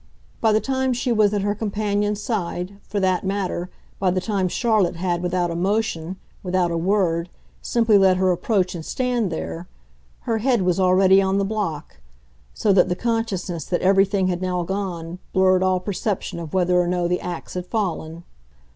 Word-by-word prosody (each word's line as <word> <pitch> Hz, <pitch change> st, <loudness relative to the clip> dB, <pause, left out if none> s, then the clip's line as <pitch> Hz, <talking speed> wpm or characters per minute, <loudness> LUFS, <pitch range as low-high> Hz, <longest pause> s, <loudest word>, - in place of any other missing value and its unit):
By 220 Hz, -, +4 dB
the 215 Hz, -, +4 dB
time 265 Hz, +1 st, 0 dB
she 245 Hz, +1 st, -1 dB
was 215 Hz, -3 st, +4 dB
at 205 Hz, -2 st, -1 dB
her 205 Hz, 0 st, +1 dB
companion's 210 Hz, -1 st, -1 dB
side, 195 Hz, -3 st, -3 dB
for 205 Hz, -, -4 dB
that 185 Hz, -2 st, +1 dB
matter, 190 Hz, -2 st, -2 dB, 0.3 s
by 190 Hz, -, +2 dB
the 185 Hz, +1 st, +1 dB
time 195 Hz, -1 st, -1 dB
Charlotte 210 Hz, -3 st, +1 dB
had, 175 Hz, 0 st, -1 dB
without 180 Hz, -1 st, 0 dB
a -, -, -3 dB
motion, 190 Hz, -2 st, -1 dB, 0.3 s
without 180 Hz, -2 st, 0 dB
a -, -, -1 dB
word, 175 Hz, -2 st, +1 dB, 0.3 s
simply 225 Hz, -3 st, +3 dB
let 190 Hz, -1 st, +4 dB
her 185 Hz, 0 st, +3 dB
approach 185 Hz, +1 st, 0 dB
and 170 Hz, -3 st, -6 dB
stand 245 Hz, -2 st, -1 dB
there, 165 Hz, +2 st, -5 dB, 0.5 s
her 225 Hz, -1 st, -1 dB
head 240 Hz, -3 st, +2 dB
was 180 Hz, +1 st, +1 dB
already 190 Hz, +1 st, +5 dB
on 190 Hz, 0 st, +1 dB
the 200 Hz, -, +1 dB
block, 195 Hz, -, -4 dB, 0.5 s
so 205 Hz, -, +1 dB
that 185 Hz, -1 st, +4 dB
the 180 Hz, -, 0 dB
consciousness 210 Hz, -6 st, -2 dB
that 175 Hz, -, -1 dB
everything 195 Hz, 0 st, +3 dB
had 180 Hz, -1 st, -1 dB
now 180 Hz, -1 st, -1 dB
gone 180 Hz, -2 st, -4 dB
blurred 185 Hz, -1 st, +4 dB
all 185 Hz, -1 st, +2 dB
perception 195 Hz, -1 st, -3 dB
of 165 Hz, -3 st, -7 dB
whether 180 Hz, -1 st, +2 dB
or 175 Hz, -, -1 dB
no 175 Hz, -1 st, 0 dB
the 180 Hz, +1 st, -1 dB
axe 175 Hz, -2 st, -6 dB
had 180 Hz, 0 st, -5 dB
fallen. 170 Hz, -6 st, -3 dB
190 Hz, 180 wpm, -22 LUFS, 180-205 Hz, 0.5 s, already